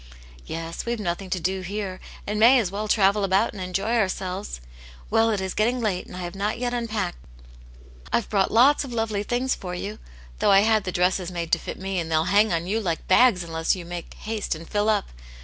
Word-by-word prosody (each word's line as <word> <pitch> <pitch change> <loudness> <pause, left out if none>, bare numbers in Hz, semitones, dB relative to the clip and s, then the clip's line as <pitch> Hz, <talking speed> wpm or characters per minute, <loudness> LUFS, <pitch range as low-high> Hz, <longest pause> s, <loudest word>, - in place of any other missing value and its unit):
" - - -20
Yes, 165 +1 -5
we've 235 -1 -2
nothing 185 -1 -3
to 185 - -1
do 190 +3 -1
here, 190 0 -4 0.3
and 210 +1 -2
may 240 +4 +7
as 210 -7 0
well 210 +2 -3
travel 200 -1 +3
about 195 +3 +2
and 195 - -7
enjoy 195 +6 -1
ourselves. 190 - -2 0.5
Well, 225 0 +4
it 210 -3 0
is 190 -1 -3
getting 240 +4 +1
late, 205 -6 -1
and 180 - -9
I - - -5
have 175 0 -5
not 205 +3 -2
unpacked 230 -6 -2
yet - - -20
I've 235 - +1
brought 195 -2 +1
lots 265 +7 +5
of 270 - -7
lovely 225 -3 -1
things 245 +5 0
for 180 -1 -6
you. 205 +4 -5 0.4
Though - - +3
I 195 0 +7
had 215 -1 +2
the 185 - -2
dresses 180 0 +1
made 170 -2 -4
to - - +4
fit - - -6
me, 190 0 -3
and 165 -1 -4
they'll 160 0 +3
hang 210 +1 +5
on 170 0 0
you 210 +5 0
like 170 -5 -3
bags 190 -2 +5
unless 165 +1 0
you 180 -2 -8
make 175 0 -7
haste 215 -5 -3
and 165 +1 -10
fill 210 +1 +1
up. 210 -2 +1
195 Hz, 225 wpm, -24 LUFS, 175-215 Hz, 0.5 s, may